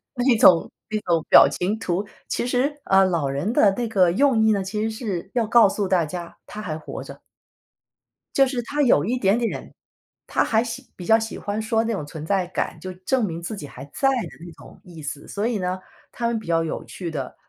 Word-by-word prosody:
那 245 Hz, -1 st, +3 dB
种 185 Hz, -8 st, +6 dB, 0.2 s
那 215 Hz, 0 st, -1 dB
种 165 Hz, -3 st, 0 dB
表 -, -, +9 dB
情 205 Hz, +5 st, -2 dB
图。 185 Hz, +2 st, -1 dB, 0.2 s
其 -, -, -2 dB
实， 275 Hz, +4 st, 0 dB
呃， 195 Hz, 0 st, +5 dB
老 165 Hz, -7 st, 0 dB
人 150 Hz, -, -2 dB
的 200 Hz, -5 st, +5 dB
那 235 Hz, +2 st, -2 dB
个 185 Hz, -5 st, +3 dB
用 265 Hz, +3 st, +3 dB
意 220 Hz, -, +4 dB
呢， 200 Hz, -2 st, +1 dB
其 210 Hz, +3 st, -3 dB
实 220 Hz, -, -1 dB
是 205 Hz, -4 st, -5 dB
要 235 Hz, -3 st, +1 dB
告 230 Hz, -3 st, +6 dB
诉 200 Hz, -1 st, -2 dB
大 175 Hz, -4 st, +2 dB
家 170 Hz, +2 st, -7 dB
他 215 Hz, -, -8 dB
还 155 Hz, -6 st, -4 dB
活 155 Hz, -, -7 dB
着。 -, -, -11 dB, 1.1 s
就 270 Hz, -1 st, +5 dB
是 250 Hz, -2 st, -2 dB
他 290 Hz, +5 st, -1 dB
有 205 Hz, -, +4 dB
一 245 Hz, +5 st, 0 dB
点 200 Hz, +1 st, +2 dB
点， 235 Hz, -2 st, -4 dB, 0.5 s
他 -, -, +1 dB
还 220 Hz, 0 st, +2 dB
喜 245 Hz, +2 st, -7 dB
比 180 Hz, -, -8 dB
较 225 Hz, 0 st, +6 dB
喜 225 Hz, 0 st, -5 dB
欢 205 Hz, +1 st, -3 dB
说 225 Hz, +1 st, +1 dB
那 230 Hz, -, -1 dB
种 185 Hz, -8 st, -3 dB
存 155 Hz, 0 st, -8 dB
在 185 Hz, +1 st, 0 dB
感， -, -, -3 dB
就 185 Hz, 0 st, -6 dB
证 220 Hz, +7 st, 0 dB
明 165 Hz, -1 st, -5 dB
自 210 Hz, +5 st, -5 dB
己 150 Hz, -, -7 dB
还 135 Hz, -1 st, -10 dB
在 270 Hz, -, 0 dB
的 250 Hz, -4 st, -1 dB, 0.2 s
那 170 Hz, -, -10 dB
种 -, -, -15 dB
意 170 Hz, -4 st, -11 dB
思， 145 Hz, 0 st, -6 dB
所 205 Hz, +2 st, -2 dB
以 235 Hz, -3 st, 0 dB
呢， 185 Hz, 0 st, -2 dB, 0.3 s
他 235 Hz, -, -2 dB
们 235 Hz, -1 st, 0 dB
比 215 Hz, -, -11 dB
较 165 Hz, -1 st, +2 dB
有 160 Hz, -, -4 dB
趣 175 Hz, -3 st, -6 dB
的， 140 Hz, -4 st, -5 dB
205 Hz, 245 characters per minute, -23 LUFS, 175-230 Hz, 1.1 s, 表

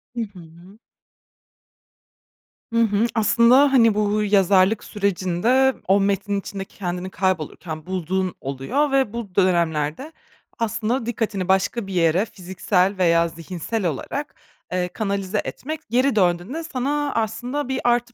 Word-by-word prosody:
Hı 235 Hz, -, -2 dB
hı. 180 Hz, -2 st, -11 dB, 1.9 s
Hı 230 Hz, -, +1 dB
hı. 210 Hz, 0 st, +2 dB
Aslında, 235 Hz, +5 st, +5 dB
hani, 230 Hz, -4 st, +5 dB
bu 210 Hz, 0 st, +1 dB
yazarlık 195 Hz, 0 st, +3 dB
sürecinde 200 Hz, +7 st, +1 dB
o 195 Hz, +2 st, +4 dB
metnin 200 Hz, 0 st, 0 dB
içinde 195 Hz, 0 st, -6 dB
kendini 180 Hz, -1 st, -5 dB
kaybolurken 160 Hz, -4 st, -3 dB
bulduğun 185 Hz, 0 st, -2 dB
oluyor 140 Hz, -, -1 dB
ve 265 Hz, -5 st, +1 dB
bu 220 Hz, -6 st, -6 dB
dönemlerde 170 Hz, -, +1 dB, 0.5 s
aslında 230 Hz, +2 st, -1 dB
dikkatini 215 Hz, -5 st, -2 dB
başka 195 Hz, +3 st, +1 dB
bir 195 Hz, -, -6 dB
yere, 175 Hz, +3 st, +2 dB
fiziksel 190 Hz, 0 st, -1 dB
veya 170 Hz, -2 st, +3 dB
zihinsel 170 Hz, +5 st, -5 dB
olarak, 225 Hz, -, -3 dB, 0.4 s
eee, 180 Hz, 0 st, 0 dB
kanalize 200 Hz, +1 st, -2 dB
etmek, 310 Hz, +3 st, -5 dB
geri 255 Hz, +1 st, +2 dB
döndüğünde 185 Hz, -, 0 dB
sana 290 Hz, -1 st, -2 dB
aslında 240 Hz, +5 st, -2 dB
bir 265 Hz, 0 st, -1 dB
artı 240 Hz, 0 st, +1 dB
200 Hz, 120 wpm, -22 LUFS, 180-235 Hz, 1.9 s, Aslında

